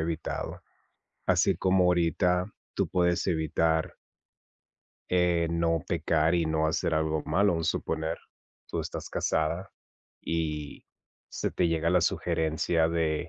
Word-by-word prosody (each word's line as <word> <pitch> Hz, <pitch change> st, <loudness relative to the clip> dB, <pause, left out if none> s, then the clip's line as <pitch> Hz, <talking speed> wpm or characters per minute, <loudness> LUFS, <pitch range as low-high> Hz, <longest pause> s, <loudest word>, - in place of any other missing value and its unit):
evitado, 80 Hz, 0 st, -3 dB, 0.7 s
así -, -, +3 dB
como 95 Hz, -1 st, +3 dB
ahorita 90 Hz, +2 st, +2 dB, 0.2 s
tú -, -, -1 dB
puedes 90 Hz, -1 st, +1 dB
evitar 80 Hz, -1 st, 0 dB, 1.2 s
eh, 90 Hz, -2 st, +2 dB
no 85 Hz, -1 st, +1 dB
pecar 80 Hz, +1 st, +1 dB
y 85 Hz, -2 st, +1 dB
no 80 Hz, 0 st, +1 dB
hacer 80 Hz, 0 st, 0 dB
algo 80 Hz, 0 st, 0 dB
malo. 100 Hz, 0 st, +3 dB
Un 80 Hz, 0 st, -2 dB
suponer, 80 Hz, 0 st, -1 dB, 0.5 s
tú -, -, -2 dB
estás -, -, -6 dB
casada, 80 Hz, +5 st, -1 dB, 0.5 s
y 75 Hz, -3 st, -3 dB, 0.4 s
se -, -, -3 dB
te 85 Hz, -, +1 dB
llega 80 Hz, 0 st, +1 dB
la 90 Hz, 0 st, +4 dB
sugerencia 80 Hz, 0 st, +1 dB
de: 80 Hz, 0 st, -1 dB
80 Hz, 120 wpm, -28 LUFS, 80-85 Hz, 1.2 s, la